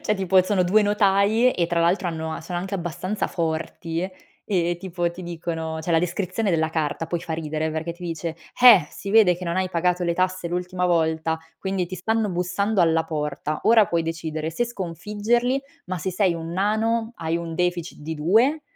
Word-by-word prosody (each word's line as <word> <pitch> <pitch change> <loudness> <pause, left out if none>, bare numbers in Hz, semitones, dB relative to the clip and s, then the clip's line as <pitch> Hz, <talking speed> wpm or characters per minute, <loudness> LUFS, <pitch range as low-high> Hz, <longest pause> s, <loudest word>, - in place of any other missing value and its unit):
Cioè, 210 - +1
tipo 190 -1 +4
sono 185 -1 +1
2 210 +5 +4
notai 205 +3 +3
e 170 - 0
tra 170 0 0
l'altro 175 +2 +2
hanno 160 -1 -4
sono 175 +2 -4
anche 190 +2 -4
abbastanza 180 +3 -3
forti 165 +1 -3 0.4
e 175 -4 +1
tipo 175 -2 -2
ti 175 +2 -10
dicono 160 -2 -4
c'è 165 - -4
la 165 - +5
descrizione 185 +4 -1
della 160 -2 +1
carta, 160 0 -2
poi 170 +1 -2
fa 165 - -5
ridere 155 0 -2
perché 160 +2 -3
ti 175 +1 -11
dice: 165 0 -3 0.3
"Eh, 220 -11 +9
si 200 - -7
vede 205 -5 +5
che 180 - -7
non 170 0 -2
hai 185 0 +1
pagato 180 0 0
le 170 -1 0
tasse 185 0 0
l'ultima 180 +1 -1
volta, 160 -1 +1 0.2
quindi 190 -1 -1
ti 185 +2 -6
stanno 220 +4 0
bussando 185 +4 0
alla 165 -1 +3
porta. 150 -1 -3
Ora 225 -2 +6
puoi 170 -1 0
decidere 160 -1 -3
se 165 +9 0
sconfiggerli, 215 - -1 0.3
ma 185 0 -3
se 185 +3 -3
sei 185 -1 +2
un 165 0 -5
nano, 220 +4 0
hai 165 0 -1
un 170 -1 -5
deficit 175 -1 -1
di 160 +2 -5
2, 225 - +3
175 Hz, 190 wpm, -24 LUFS, 165-195 Hz, 0.4 s, Eh